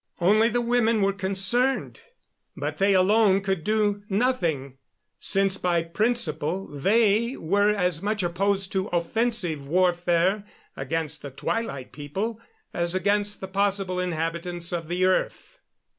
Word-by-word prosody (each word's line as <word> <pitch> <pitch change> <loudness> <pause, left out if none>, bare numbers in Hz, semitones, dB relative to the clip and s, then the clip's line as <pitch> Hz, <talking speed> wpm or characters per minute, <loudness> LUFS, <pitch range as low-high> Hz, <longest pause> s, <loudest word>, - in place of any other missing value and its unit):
Only 215 +6 +4
the 240 +1 0
women 235 -3 +2
were 195 0 +2
concerned, 195 +7 0 0.6
but - - -4
they 195 0 +4
alone 195 +1 +4
could 190 -4 -2
do 210 0 +1
nothing, 170 - -1 0.4
since 195 0 +2
by 170 -2 +1
principle 185 -2 0
they 215 - +1
were 205 +5 +2
as 180 -6 0
much 210 -1 -1
opposed 195 +2 0
to 190 0 -1
offensive 175 -4 -1
warfare 175 +3 +2 0.3
against 155 +3 -3
the 140 - -7
Twilight 140 - -4
People 195 - -4 0.3
as 170 +1 -1
against 205 +2 0
the 190 - -5
possible 195 -1 -1
inhabitants 170 0 -3
of 165 -2 -3
the 180 +2 0
earth. 185 - -1
190 Hz, 130 wpm, -25 LUFS, 170-210 Hz, 0.6 s, Only